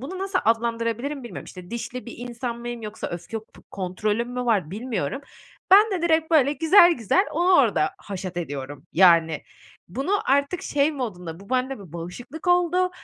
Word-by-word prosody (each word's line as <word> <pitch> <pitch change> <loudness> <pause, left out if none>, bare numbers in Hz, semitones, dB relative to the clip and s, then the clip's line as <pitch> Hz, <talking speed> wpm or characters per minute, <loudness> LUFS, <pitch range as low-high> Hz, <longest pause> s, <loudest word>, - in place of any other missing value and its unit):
bunu 330 +9 -6
nasıl 385 0 -1
adlandırabilirim 230 +4 0
bilmiyorum. 235 - -8
İşte, 180 -1 -11
dişli 240 +1 -5
bir 235 - -8
insan 240 0 -5
mıyım 240 -1 -6
yoksa 215 +1 -5
öfke 175 +6 -5
p 220 - -18
kontrolüm 210 +5 -2
mü 250 0 -3
var, 205 -9 +1
bilmiyorum. 215 - -3 0.5
Ben 420 +3 +8
de 350 -3 -2
direkt, 320 -1 +2
böyle, 285 -2 +5
güzel 340 +4 +6
güzel 260 - +1
onu 350 +4 +2
orada 210 - +2
haşat 185 -2 -7
ediyorum, 145 -3 -6
yani. 165 -3 +5 0.5
Bunu 270 - -3 0.2
artık 280 +5 +1
şey 290 +2 +1
modunda, 180 - -5
bu 200 - -15
bende 260 -1 0
bir 185 -6 -13
bağışıklık 180 - -8
oldu, 355 +1 +3
240 Hz, 165 wpm, -24 LUFS, 190-295 Hz, 0.5 s, Ben